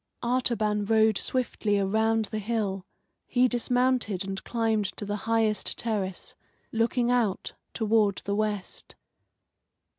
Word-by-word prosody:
Artaban 235 Hz, -4 st, +1 dB
rode 220 Hz, -1 st, +3 dB
swiftly 230 Hz, -5 st, -1 dB
around 220 Hz, +3 st, +1 dB
the 215 Hz, +1 st, -4 dB
hill. 200 Hz, -3 st, -2 dB, 0.4 s
He 250 Hz, 0 st, +3 dB
dismounted 245 Hz, -5 st, +1 dB
and 195 Hz, 0 st, -4 dB
climbed 225 Hz, -3 st, 0 dB
to 205 Hz, -, -4 dB
the 205 Hz, +1 st, -2 dB
highest 220 Hz, -3 st, +1 dB
terrace, 200 Hz, -5 st, -3 dB, 0.4 s
looking 235 Hz, +2 st, +1 dB
out 230 Hz, -6 st, 0 dB, 0.2 s
toward 215 Hz, -3 st, +2 dB
the 200 Hz, -, -1 dB
west. 210 Hz, -2 st, -3 dB
220 Hz, 115 wpm, -27 LUFS, 205-235 Hz, 0.4 s, rode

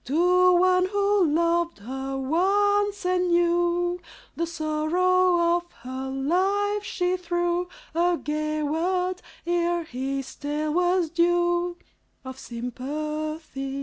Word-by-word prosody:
To 360 Hz, +5 st, +4 dB
one 365 Hz, 0 st, +3 dB
who 405 Hz, -1 st, +2 dB
loved 335 Hz, +2 st, +1 dB
her 265 Hz, +5 st, -5 dB
once 405 Hz, +7 st, +1 dB
and 365 Hz, 0 st, +1 dB
knew 350 Hz, +1 st, +1 dB, 0.3 s
The 335 Hz, -, -1 dB
sorrow 340 Hz, +2 st, +2 dB
of 345 Hz, 0 st, -9 dB
her 260 Hz, +1 st, -5 dB
life, 385 Hz, +9 st, 0 dB
she 360 Hz, -2 st, -1 dB
threw 350 Hz, 0 st, -1 dB, 0.2 s
A 345 Hz, +1 st, +2 dB
gay 305 Hz, 0 st, -2 dB
word, 360 Hz, +4 st, -1 dB, 0.2 s
ere 345 Hz, 0 st, 0 dB
his 270 Hz, -1 st, -4 dB
tale 300 Hz, +1 st, -3 dB
was 355 Hz, -1 st, +1 dB
due 345 Hz, 0 st, +1 dB, 0.5 s
Of 260 Hz, 0 st, -8 dB
sympathies. 275 Hz, +3 st, -5 dB
345 Hz, 110 wpm, -25 LUFS, 305-360 Hz, 0.5 s, To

